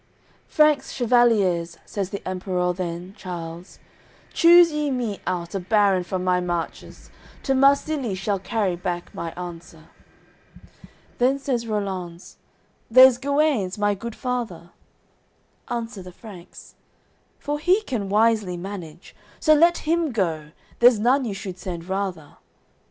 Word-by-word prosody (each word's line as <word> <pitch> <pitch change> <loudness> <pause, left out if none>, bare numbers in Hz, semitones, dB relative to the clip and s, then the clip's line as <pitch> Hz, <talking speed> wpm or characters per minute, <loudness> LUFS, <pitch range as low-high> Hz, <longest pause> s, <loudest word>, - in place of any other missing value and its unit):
AOI. - - -38
XX - - -36
"Franks, 305 -2 +3
chevaliers," 210 -9 +2
says 195 -3 -4
the 200 -1 -7
Emperour 180 -1 -1
then, 175 +1 -5
Charles, 175 -3 -8 0.6
"Choose 340 0 +7
ye 300 -1 -1
me 240 -6 -2
out 170 -2 -3
a 195 - -1
baron 195 -1 +2
from 180 +1 -4
my 180 0 +2
marches, 175 -2 -5 0.3
To 270 - +1
Marsilie 275 -3 +2
shall 195 +1 -2
carry 195 -2 -1
back 175 0 -5
my 165 - -5
answer." 170 -2 -10 1.3
Then 260 +3 +3
says 255 -4 -2
Rollanz: 190 -5 -5 0.5
"There's 255 +1 +7
Guenes, 280 -9 0
my 205 0 +1
goodfather." 230 -5 -5 1.0
Answer 230 -4 -4
the 180 0 -10
Franks: 185 -2 -13 0.6
"For 295 +1 -4
he 365 +7 +3
can 220 - -3
wisely 210 -3 +2
manage; 175 -2 -9 0.2
So 310 - +4
let 335 +3 +3
him 330 -2 +1
go, 165 -9 -2 0.3
there's 240 -1 +6
none 250 +5 +2
you 210 -4 -4
should 190 -2 -7
send 175 -2 -6
rather." 190 -5 -4
200 Hz, 130 wpm, -23 LUFS, 180-250 Hz, 1.3 s, Choose